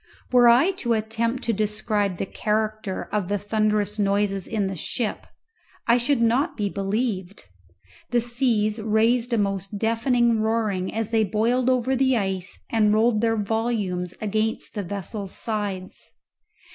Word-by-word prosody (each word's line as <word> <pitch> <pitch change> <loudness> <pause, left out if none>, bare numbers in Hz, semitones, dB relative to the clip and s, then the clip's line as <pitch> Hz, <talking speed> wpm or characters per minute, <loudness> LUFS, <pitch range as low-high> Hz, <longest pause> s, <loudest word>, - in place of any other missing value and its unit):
Were 245 -1 +6
I 250 +11 +6
to 235 -1 +1
attempt 225 +3 -1
to 230 - 0
describe 210 -2 0
the - - -2
character 215 -1 -2
of 205 -4 -1
the 205 +1 0
thunderous 210 0 0
noises 200 -1 +1
in 215 -3 -1
the 190 0 -3
ship 215 +6 -3 0.6
I 235 +1 +4
should 245 0 +1
not 245 +8 +1
be 205 -2 0
believed. 200 - -2 0.7
The 240 - +2
seas 235 -3 +1
raised 225 +3 +2
a 235 - +2
most 195 0 -1
deafening 230 +1 +2
roaring 215 -4 0
as 225 0 -3
they 225 -1 +3
boiled 230 +5 +1
over 255 +1 +2
the 260 -1 +3
ice 190 -3 -3
and 215 -2 +3
rolled 220 0 +3
their 225 -1 +2
volumes 205 -5 -1
against 215 +1 -2
the 210 - -2
vessel's 200 +1 -5
sides. 205 -4 -4
215 Hz, 145 wpm, -24 LUFS, 200-235 Hz, 0.7 s, Were